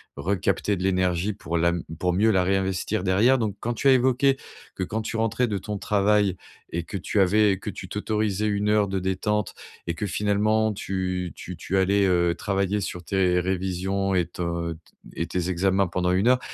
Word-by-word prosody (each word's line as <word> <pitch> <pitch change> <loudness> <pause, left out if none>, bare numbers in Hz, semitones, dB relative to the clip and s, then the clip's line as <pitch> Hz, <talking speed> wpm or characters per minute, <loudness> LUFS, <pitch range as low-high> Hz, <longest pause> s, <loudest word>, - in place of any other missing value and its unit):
recapter 95 +5 0
de 90 - -4
l'énergie 95 +1 +1
pour 85 -4 -3
la 85 +1 +2 0.2
pour 90 +1 0
mieux 105 +5 +3
la 95 -2 +3
réinvestir 95 +1 0
derrière. 105 +8 +4
Donc 110 -4 -1
quand 120 - -2
tu 135 - 0
as 135 - +8
évoqué 130 +2 +3 0.4
que - - -2
quand 110 +4 -3
tu 110 - -5
rentrais 115 +2 +1
de 105 -3 -2
ton 105 +2 -5
travail 100 -1 +2 0.4
et 85 0 -2
que 100 - -5
tu 95 +3 -1
avais 100 +1 +4
que 105 - -6
tu 95 - -8
t'autorisais 105 +1 -1
1 105 0 0
heure 105 -1 +3
de 95 - -1
détente 95 +2 -1 0.3
et 85 - 0
que 105 - -3
finalement, 105 +3 +1
tu 90 -2 -3
tu 90 - -8
tu 95 +3 -2
allais, 100 +1 +3
heu, 85 -2 +2
travailler 100 0 0
sur 90 -2 -5
tes 90 -1 +2
révisions 95 +1 -1
et 90 -2 +2
t 90 - -6 0.7
et - - -1
tes 90 0 -2
examens 95 +2 +2
pendant 90 +1 0
1 95 +5 +2
heure. 125 0 +5
95 Hz, 190 wpm, -25 LUFS, 90-105 Hz, 0.7 s, as